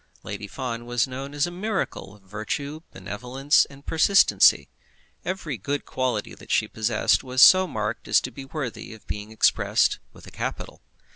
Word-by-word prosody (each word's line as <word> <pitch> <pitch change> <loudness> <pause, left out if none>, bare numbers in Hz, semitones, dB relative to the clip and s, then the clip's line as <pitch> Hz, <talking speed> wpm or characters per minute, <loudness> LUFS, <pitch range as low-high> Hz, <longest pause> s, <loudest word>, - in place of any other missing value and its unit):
Lady 100 0 -6
Fawn 120 0 -5
was 120 +1 +1
known 135 +2 -7
as 145 - +2
a 175 - -5
miracle 180 - -4
of 100 - -22
Virtue, 110 +10 -5
Benevolence, 125 +9 +1
and 140 0 -16
Persistency. 180 +5 +4 0.6
Every 175 -7 -4
good 145 +8 -3
quality 125 -5 -2
that - - -15
she - - +2
possessed 110 0 +1
was 130 0 -3
so 185 +7 +8
marked 105 -4 -4
as - - +5
to 130 - -6
be 135 +3 -9
worthy 135 -5 -6
of 110 - -19
being 105 +3 -6
expressed 110 - +2
with - - -16
a - - -12
capital. - - -6
130 Hz, 165 wpm, -24 LUFS, 110-145 Hz, 0.6 s, so